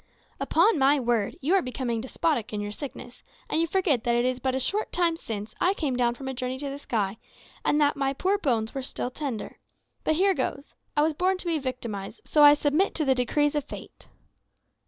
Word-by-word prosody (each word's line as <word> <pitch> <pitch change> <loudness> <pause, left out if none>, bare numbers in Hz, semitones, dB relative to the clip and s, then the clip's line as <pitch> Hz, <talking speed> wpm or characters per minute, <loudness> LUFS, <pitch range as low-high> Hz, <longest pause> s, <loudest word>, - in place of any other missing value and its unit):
"Upon 440 -9 +3
my 275 +2 +4
word, 235 -5 0
you 310 +7 +1
are 390 - +5
becoming 250 -4 -2
despotic 260 -1 -1
in 210 - -3
your 205 0 -4
sickness, 250 0 -8 0.3
and 320 - +1
you 335 - +1
forget 320 - +1
that 240 -1 +2
it 240 +1 +2
is 255 0 0
but 260 0 -1
a - - 0
short 405 +11 -1
time 345 -2 +2
since 215 -9 -6
I 375 +2 +3
came 285 -8 -1
down 240 -1 +1
from 265 +1 -8
a 265 - -2
journey 255 0 -3
to 280 +1 -4
the 280 - -6
sky, 215 -6 -2 0.4
and 295 - +2
that 290 -1 +3
my 275 -1 0
poor 385 +8 +1
bones 230 - 0
are 270 - -2
still 255 -1 -4
tender. 260 -5 -5 0.4
But 315 - +2
here 385 +4 +4
goes. 280 0 -3 0.2
I 295 - +5
was 315 +1 +2
born 370 +4 +1
to 365 - -6
be 330 -2 +1
victimised, 245 - -5
so 300 - +3
I 290 0 +9
submit 300 +6 +1
to 310 - 0
the 265 - +4
decrees 285 +4 +1
of 295 -1 0
Fate." - - -11
270 Hz, 220 wpm, -26 LUFS, 245-310 Hz, 0.4 s, I